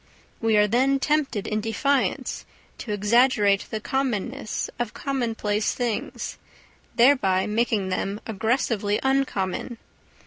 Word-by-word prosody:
We 225 -2 +2
are 210 - +5
then 260 +6 +2
tempted 280 -8 0
in 215 0 -1
defiance 265 +5 0 0.4
to 220 - -5
exaggerate 210 -1 +3
the 220 - -3
commonness 255 -1 -2
of 240 -3 -3
commonplace 225 -6 -1
things, 240 -3 -3 0.6
thereby 235 -7 +4
making 215 -3 0
them 195 +2 -2
aggressively 220 -1 0
uncommon. 255 -5 -1
225 Hz, 105 wpm, -24 LUFS, 205-260 Hz, 0.6 s, are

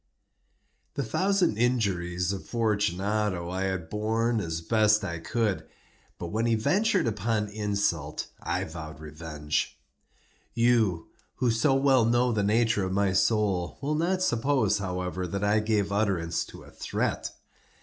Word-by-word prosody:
The - - -1
thousand 190 - +1
injuries 95 -7 +1
of 95 - -5
Fortunato 105 -4 0
I 95 +1 -1
had 95 -4 -2
borne 110 +4 0
as 80 -4 -3
I 80 - -14
best 110 -1 +4 0.2
could; 105 +1 -1 0.5
but 85 - -5
when 110 +5 0
he 115 - +3
ventured 190 - +2
upon 110 -1 0
insult, 100 -8 -1 0.2
I - - -1
vowed 80 -1 -8
revenge. 75 -1 -3 0.8
You, 115 -8 +2 0.3
who 125 -2 +1
so 135 +5 +2
well 135 -2 +4
know 120 +2 +3
the 110 -3 +1
nature 110 +1 +2
of 95 0 -2
my 100 -1 +2
soul, 95 -3 +1
will 145 +2 -1
not 180 +4 +1
suppose, 120 - +2
however, 90 -1 -3
that 100 +3 -3
I 105 +1 +3
gave 105 -2 0
utterance 95 -5 0
to - - -12
a - - -15
threat. - - -2
105 Hz, 140 wpm, -27 LUFS, 90-115 Hz, 0.8 s, best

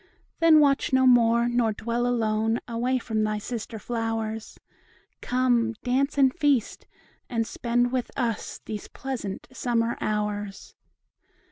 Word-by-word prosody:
Then 330 -2 +7
watch 280 -2 +3
no 260 0 +4
more, 235 -1 +5
nor 240 -2 +1
dwell 235 +3 -2
alone, 225 -1 +1
Away 245 +2 0
from 220 -3 -1
thy 215 0 0
sister 225 +1 -5
flowers; 225 -1 -3 0.6
Come, 245 -2 +1
dance 270 +3 0
and 265 -2 +4
feast, 290 -9 0 0.4
and 230 -2 0
spend 240 +2 0
with 255 -2 -1
us 235 -4 -2
These 210 -2 -6
pleasant 245 -8 -6
summer 235 -2 -1
hours. 210 -1 -3
235 Hz, 125 wpm, -26 LUFS, 220-255 Hz, 0.6 s, Then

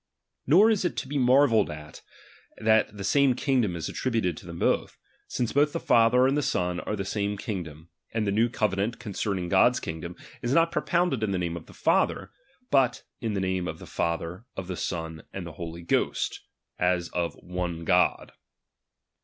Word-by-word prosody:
Nor 195 +11 +6
is 210 -4 +1
it 175 - -1
to - - -3
be 145 +1 -1
marveled 125 -4 +4
at, 75 0 -9 0.6
that 110 -1 +2
the 100 - -5
sarae 140 +5 +4
_ - - -13
kingdom 125 -11 +1
is 80 -2 -4
attributed 115 -9 -1
to - - -11
them 85 -1 -7
both; - - 0 0.3
since 120 -2 -2
both 145 +2 +4
H - - -20
the - - -1
Father 120 +2 +4
and 135 +1 +2
the 150 - +2
Son 90 -8 -1
are 105 - -3
the 95 -2 -4
same 105 +1 -1
God; 95 -4 -4
and 75 - -10 0.5
■ - - -2
the 100 - +1
new 115 +4 +2
covenant 105 0 -1
concerning 100 -5 -3
God's 100 +7 +4
kingdom, 80 +2 -6 0.3
is 120 +2 -1
not 165 +1 +4
propounded 170 -8 +1
in 110 - 0
the 95 - 0
name 85 -1 -2
of 85 - -8
the - - -14
Father; 95 +1 +1 0.4
but 135 -3 +3 0.2
in 110 -3 -2
the - - 0
name 95 -1 -1
of - - -5
the - - -11
Father, 85 +6 -3
of 95 - -4
the 90 0 -4
Son, 80 -2 -4
and 95 - -4
of 80 - -8
the - - -20
Holy 85 0 -6
Ghost, 85 - 0 0.4
as 90 -1 +1
of 85 -1 -2
one 90 -2 -4
God. - - +2
100 Hz, 205 wpm, -27 LUFS, 90-125 Hz, 0.6 s, Nor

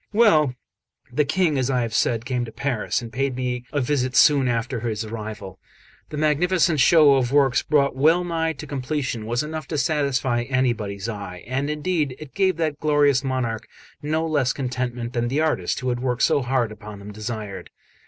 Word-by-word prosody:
Well, 155 - +4 0.6
the 150 - +2
King, 160 -3 +1
as 130 0 0
I 125 -2 +1
have 115 -2 -4
said, 115 +1 +1
came 125 -1 -1
to 115 - -9
Paris, 130 -1 -2
and 115 -1 -9
paid 135 0 -1
me 125 -1 -3
a 145 - 0
visit 130 -1 0
soon 140 -3 +5
after 120 +1 -1
his 110 -1 -3
arrival. 110 -4 -7 0.5
The 150 - -6
magnificent 160 +2 +2
show 150 +2 +6
of 125 -2 0
works 140 -3 +3
brought 140 -3 +2
well 160 +6 +4
nigh 165 -2 -1
to 155 - -9
completion 130 -5 -3
was 120 +3 0
enough 155 -1 -5
to 155 - -3
satisfy 135 -5 0
anybody's 115 -6 -1
eye; 100 -5 -6
and 135 +3 -2
indeed 150 -3 -1
it 155 -3 -11
gave 190 -3 +1
that 155 -3 -1
glorious 145 -3 +3
monarch 130 -4 -2 0.3
no 155 +2 -1
less 145 -5 +1
contentment 125 -2 -3
than 120 -1 0
the 140 +5 0
artist 150 - 0
who 130 - -1
had 120 -1 -1
worked 125 -1 -1
so 145 - +3
hard 125 -3 0
upon 105 -1 -10
them 100 +1 -9
desired. 105 -2 -6
130 Hz, 185 wpm, -23 LUFS, 120-150 Hz, 0.6 s, show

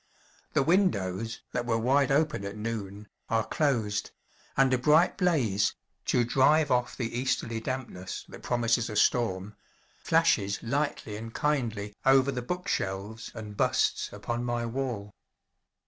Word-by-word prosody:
The - - +3
windows, 115 - +1
that 120 -1 -2
were 115 -1 +2
wide 130 +4 +3
open 150 -5 +1
at 100 +2 -5
noon, 105 -2 -5 0.2
are 115 -1 +1
closed; 110 -9 0 0.5
and 135 -1 +4
a - - +4
bright 150 +6 +4
blaze 135 - +1 0.3
to 120 - +3
drive 145 +5 +3
off 125 -1 +1
the 120 -2 -3
easterly 115 -3 -1
dampness 115 -7 -5
that - - -11
promises 120 -1 +1
a 105 - -5
storm 105 -3 +1 0.5
flashes 160 -12 +2
lightly 125 -4 -2
and 115 +1 -7
kindly 115 -9 -1
over 135 0 +5
the 125 -2 -3
book 180 +9 -4
shelves 100 +4 -3
and 105 -2 -7
busts - - +1
upon 120 +4 -4
my 120 -1 -1
wall. 115 -5 -3
120 Hz, 140 wpm, -28 LUFS, 105-135 Hz, 0.5 s, over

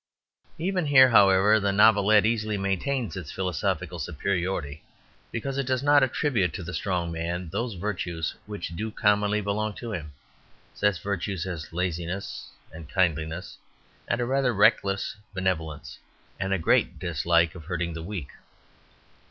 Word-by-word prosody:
Even 180 -1 -1
here, 130 -2 +7
however, 100 0 +6
the 100 -1 +1
Novelette 105 0 +5
easily 110 -2 0
maintains 105 +6 -1
its 85 -6 -6
philosophical 90 -1 -2
superiority, 85 -3 -2 0.5
because 135 +4 -3
it 135 - -2
does 130 0 0
attribute 130 - +3
to 90 - -5
the 90 +1 -6
strong 90 -4 -1
man 85 +1 -3
those 115 +5 -3
virtues 85 -4 -3
which 105 -4 -5
do 105 +7 -4
commonly 105 -1 +2
belong 105 +1 -1
to 115 +1 -7
him, 75 -5 -6 0.6
such 105 -3 0
virtues 95 -2 -2
as 85 -5 -6
laziness 90 +2 -3 0.2
and 80 -1 -10
kindliness 80 -2 -1 0.5
and - - 0
a 120 - 0
rather 130 -1 +1
reckless 100 0 +2 0.2
benevolence, 80 -5 -3 0.4
and 95 0 -2
a 95 - +2
great 80 - +2
dislike 85 -1 +1
of 85 -4 -11
hurting 85 -1 -2
the 80 - -6
weak. 85 -5 -6
95 Hz, 140 wpm, -26 LUFS, 85-110 Hz, 0.6 s, here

